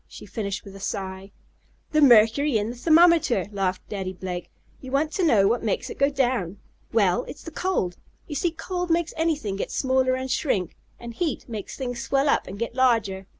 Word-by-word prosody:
she - - -11
finished 200 -3 -4
with 195 -1 -11
a - - -10
sigh. 190 0 -5 0.6
"The 305 - +3
mercury 240 +1 +5
in 215 +2 -2
the - - -8
thermometer!" 320 - +4
laughed 190 -2 -2
Daddy 190 -2 -4
Blake. 180 -1 -6 0.3
"You 260 - -9
want 295 +3 +1
to 375 - -1
know 220 - +4
what 235 +3 +1
makes 215 - -2
it - - -9
go 280 +1 +4
down? 245 -9 -1 0.3
Well, 210 +1 +2
it's - - -10
the 330 - -8
cold. 250 - -1 0.3
You 300 - -7
see 320 +5 +1
cold 355 +2 -4
makes 335 0 +1
anything 305 -12 -1
get - - -3
smaller 260 -1 +1
and 260 0 -4
shrink, 195 - -1 0.2
and 235 -1 -8
heat 310 +3 -3
makes 215 -5 -6
things 245 -3 -4
swell 275 +1 +1
up, - - +1
and 195 - -7
get 230 +2 -3
larger. 220 -7 +1
240 Hz, 195 wpm, -25 LUFS, 195-290 Hz, 0.6 s, mercury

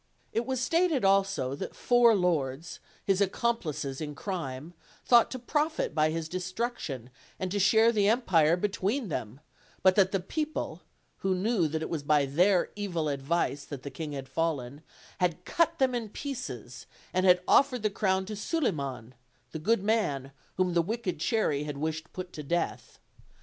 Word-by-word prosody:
It 235 +2 -1
was 260 -1 -1
stated 325 - +2
also 195 -9 +2
that 140 - -6
four 240 -2 +5
lords, 160 -5 -1 0.3
his 195 0 +2
ac 200 - +3
complices 155 - -2
in 150 -1 -5
crime, 160 -4 -5 0.3
thought 240 -2 +6
to 260 - -5
profit 300 - -1
by 155 0 +3
his 160 0 -3
destruction 180 - -4 0.3
and 185 -1 -3
to 205 - 0
share 220 +4 +5
the 205 -3 +2
empire 180 -8 +3
between 205 +5 -1
them; 125 -2 -5 0.4
but 185 - +6
that 190 -2 +5
the 195 - +1
peo 305 - -2
ple, 310 - -5 0.4
who 190 -1 0
knew 190 -2 +1
that 160 +1 -3
it - - -4
was 160 -3 -1
by 145 0 +3
their 175 +7 +3
evil 175 -7 -2
advice 140 +1 -1
that 140 -4 -8
the 140 - -6
king 150 +2 -5
had 135 -1 -6
fallen, 145 -2 -2 0.4
had 180 -1 0
cut 335 - +1
them 265 -3 +2
in 230 -3 -3
pieces, 260 +2 -6 0.3
and 185 0 +2
had 180 -1 +5
offered 255 -4 +4
the 215 - +1
crown 190 -1 +1
to 215 +2 -5
Suliman, 140 - -2 0.4
the 160 - -5
good 205 +5 +1
man 165 - 0 0.3
whom 185 -1 +1
the 170 - +4
wicked 195 -3 -3
Cherry 155 -6 +1
had 145 -2 -5
wished 155 +2 -2
to - - -26
put 185 -1 -7
to 150 - -6
death. 170 +4 -2
180 Hz, 175 wpm, -29 LUFS, 150-220 Hz, 0.4 s, thought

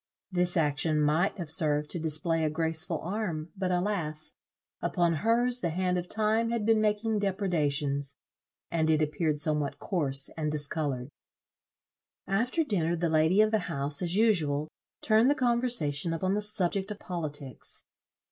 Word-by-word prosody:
This 180 -1 +1
action 150 0 +1
might 155 +7 +2
have 170 -5 -4
served 150 -2 +1
to 175 - -1
display 165 +1 0
a 155 - +2
graceful 160 +2 -1
arm, 175 -4 -3
but, 190 -2 -2
alas! 175 -5 -1 0.5
upon 170 -1 +1
hers 240 +2 +2
the 170 - 0
hand 180 +2 0
of 180 - -7
time 220 +1 +1
had 230 -3 -1
been 220 -1 +4
making 215 +1 +1
depredations, 150 -8 0 0.5
and 160 -1 +1
it 155 -1 +3
appeared 155 0 -1
somewhat 150 -2 -1
coarse 140 -8 -1
and 150 -2 -2
discoloured. 145 -3 0 1.2
After 235 - +1
dinner, 175 - 0
the 170 0 0
lady 160 +5 +4
of 215 0 +3
the 220 - +3
house, 140 +2 +1
as 175 0 0
usual, 155 -9 +2 0.3
turned 220 +3 +4
the 290 - +3
conversation 235 - 0
upon 185 +4 0
the 210 - 0
subject 200 -1 0
of 210 - -5
politics. 150 -8 -5
170 Hz, 150 wpm, -29 LUFS, 150-205 Hz, 1.2 s, been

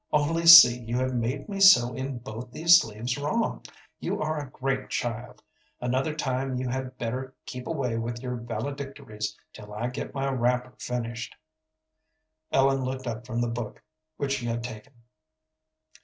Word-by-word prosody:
"Only 165 +3 +1
see, 145 -8 +11
you 120 0 -3
have 130 0 0
made 125 +3 -2
me 200 -2 -5
sew 125 - +7
in 130 +1 -4
both 120 +1 -8
these 165 +6 +6
sleeves 115 +4 -4
wrong. 150 +11 -1 0.4
You - - -3
are 155 0 -1
a 145 -3 -7
great 135 0 -3
child. 120 0 -4 0.4
Another 130 +5 -1
time 130 -2 -2
you 125 0 -2
had 130 0 -4
better 130 +3 -4
keep 125 0 -7
away 130 -8 -2
with 120 +1 -4
your 125 0 -4
valedictories 115 -3 -5 0.2
till 105 -1 -11
I 110 +4 -3
get 125 +2 -6
my 135 0 -1
wrapper 125 0 0
finished." 120 -1 -4 1.2
Ellen 135 0 +3
looked 130 0 -4
up 120 0 -5
from 120 -1 -2
the 120 - 0
book 115 -1 -6 0.3
which 140 -1 -1
she 120 - -5
had 115 0 -2
taken. 125 +3 -9
125 Hz, 160 wpm, -27 LUFS, 120-135 Hz, 1.2 s, see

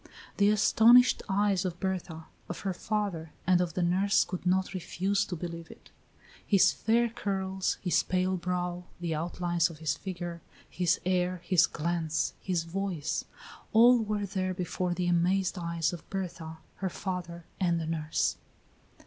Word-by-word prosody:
The 205 0 +4
astonished 230 +4 +6
eyes 200 -1 +2
of 180 -2 -4
Berta, 180 -4 -3 0.2
of 175 - -5
her 195 -2 -2
father, 190 -6 -3
and 180 0 +4
of 170 -3 -2
the 180 - +1
nurse 190 +4 +3
could 180 -1 -5
not 185 +1 +1
refuse 195 +2 -1
to 180 - -5
believe 170 -1 -6
it. - - -15 0.5
His 195 -2 +4
fair 235 +2 +2
curls, 190 -4 -2
his 180 - +3
pale 185 +1 0
brow, 180 0 -3
the 170 -2 -2
outlines 175 +1 0
of 165 - -10
his 150 -2 -1
figure, 175 -2 -6 0.3
his 180 -1 +1
air, 180 0 +1
his 185 -3 +4
glance, 160 -1 -1
his 180 -3 -1
voice 175 -3 -3 0.5
all 240 +2 +7
were 210 -1 -1
there 185 -1 -2
before 180 0 -2
the 180 - -1
amazed 180 +2 +1
eyes 170 -1 -1
of 170 - -9
Berta, 170 -4 -5 0.2
her 190 - -2
father, 175 -2 -5
and 175 -3 +1
the 165 - -3
nurse. 160 -1 -1
180 Hz, 155 wpm, -29 LUFS, 170-195 Hz, 0.5 s, all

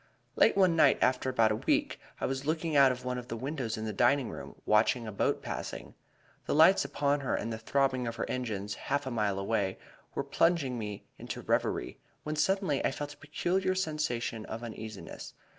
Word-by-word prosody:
"Late - - +4
one 185 -4 +5
night, 150 -4 +5
after 130 0 +2
about 115 -4 +3
a - - +1
week, - - 0 0.2
I - - -1
was 135 +1 -2
looking 160 +1 -1
out 135 -2 +7
of 125 0 -6
one 125 0 -2
of 120 - -10
the 115 - -4
windows 130 -3 -3
in 110 - -4
the 110 - -3
dining 120 +5 +3
room, - - -9
watching 110 +3 +3
a 110 - -5
boat 100 - 0
passing. - - -5 0.5
The - - +1
lights 165 +5 +6
upon 145 0 0
her 135 - -1
and 115 - -3
the 110 - -5
throbbing 130 +1 +1
of 115 - -3
her - - -3
engines, 105 -5 -3
half 145 +7 -2
a 130 - -3
mile 105 -4 0
away, 100 -1 -1 0.4
were 140 - 0
plunging 140 -3 +1
me 105 -2 -6
into - - -6
a - - -17
reverie, - - -1 0.2
when 155 0 -3
suddenly 160 -2 +1
I - - +3
felt 145 +2 -5
a - - -21
peculiar 180 +6 -1
sensation 150 -10 -2
of 115 +2 -6
uneasiness. 110 -3 -8
130 Hz, 205 wpm, -30 LUFS, 110-150 Hz, 0.5 s, out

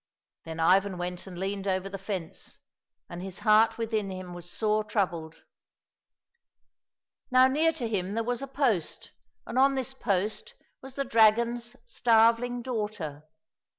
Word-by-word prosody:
Then 165 0 -7
Ivan 190 +3 +3
went 180 +1 -5
and 180 -2 -9
leaned 195 +1 -3
over 190 0 0
the 195 0 -7
fence, 190 -4 -6 0.5
and 175 0 -8
his 190 0 -5
heart 215 +1 +5
within 220 -3 -2
him 185 -1 -7
was 175 0 -9
sore 215 +2 0
troubled. 170 -7 -3 1.9
Now 255 0 +6
near 305 +5 +3
to 260 -7 -4
him 200 -2 -2
there 230 - 0
was 245 +1 -2
a 275 - -5
post, 255 - -1 0.3
and 255 - -2
on 275 +1 +5
this 265 0 -3
post 220 - -2 0.3
was 265 0 -11
the 275 - -2
dragon's 235 +1 +3
starveling 240 - +3
daughter. 210 - -4
215 Hz, 145 wpm, -28 LUFS, 185-245 Hz, 1.9 s, Now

